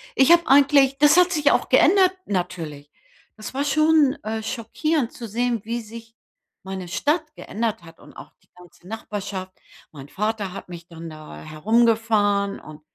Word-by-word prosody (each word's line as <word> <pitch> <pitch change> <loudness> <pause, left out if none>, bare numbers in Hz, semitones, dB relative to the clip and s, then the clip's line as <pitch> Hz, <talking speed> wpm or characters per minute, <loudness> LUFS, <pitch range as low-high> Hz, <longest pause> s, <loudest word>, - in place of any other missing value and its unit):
ich 270 +4 +4
habe 340 -1 +5
eigentlich 275 -1 +4
das 295 +3 +5
hat 360 0 +5
sich 295 -3 +2
auch - - +1
geändert 375 -1 +4
natürlich. 165 -6 -4 0.5
Das 215 +3 -8
war 280 - 0
schon, 305 -1 +3
äh, 220 0 -4
schockierend 250 +5 -2
zu 235 - -8
sehen, 235 0 -1
wie 235 +1 -3
sich 225 +1 -12 0.5
meine 190 -2 -6
Stadt 300 - -1
geändert 225 -3 -4
hat 165 -1 -16
und - - -16
auch - - -12
die - - -34
ganze 180 0 -18
Nachbarschaft. 200 -3 -6 0.4
Mein 140 -2 -12
Vater 210 -2 -3
hat 195 - -10
mich 170 -1 -10
dann 165 -1 -10
da 155 -1 -11
herumgefahren 205 +3 +1
und 155 0 -13
220 Hz, 160 wpm, -22 LUFS, 185-275 Hz, 0.5 s, habe